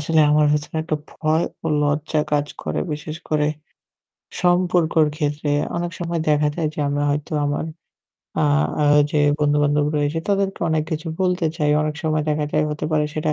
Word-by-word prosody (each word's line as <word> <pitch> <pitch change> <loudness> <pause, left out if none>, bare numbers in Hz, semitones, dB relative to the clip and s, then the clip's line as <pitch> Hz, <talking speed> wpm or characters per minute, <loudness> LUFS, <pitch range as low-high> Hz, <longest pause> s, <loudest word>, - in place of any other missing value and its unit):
আসলে 160 +1 +2
আমার 150 0 +4
ভেতরে 150 +2 -2
একটা 155 -1 -1
ভয় 160 +1 0 0.2
ও - - -1 0.2
লজ্জা 150 +1 0
কাজ 145 0 +2 0.2
করে। - - -2
বিশেষ 150 +1 -5
করে 150 -1 +1 0.9
সম্পর্কর 175 -3 +3
ক্ষেত্রে 150 -1 -1 0.3
অনেক 175 0 -2
সময় 170 -1 -2
দেখা 150 0 +3
যায় 160 -3 -1
যে - - -12
আমরা 145 0 -1
হয়তো 150 +2 -3
আমার 145 +2 -1 0.8
আ - - +4 0.4
আ - - +3 0.3
যে 150 - +1 0.2
বন্ধু-বান্ধব 145 0 +2
রয়েছে 145 +2 0
তাদেরকে 195 -1 0
অনেক 160 -1 +1
কিছু 160 +1 -3
বলতে 180 -2 +1
চাই। 150 -3 +1
অনেক 155 0 -2
সময় 155 -1 +1
দেখা 150 0 +1
যায় 155 0 +2
হতে 150 0 -4
পারে 150 -1 +2
সেটা 155 0 0
155 Hz, 170 wpm, -21 LUFS, 150-165 Hz, 0.9 s, আমার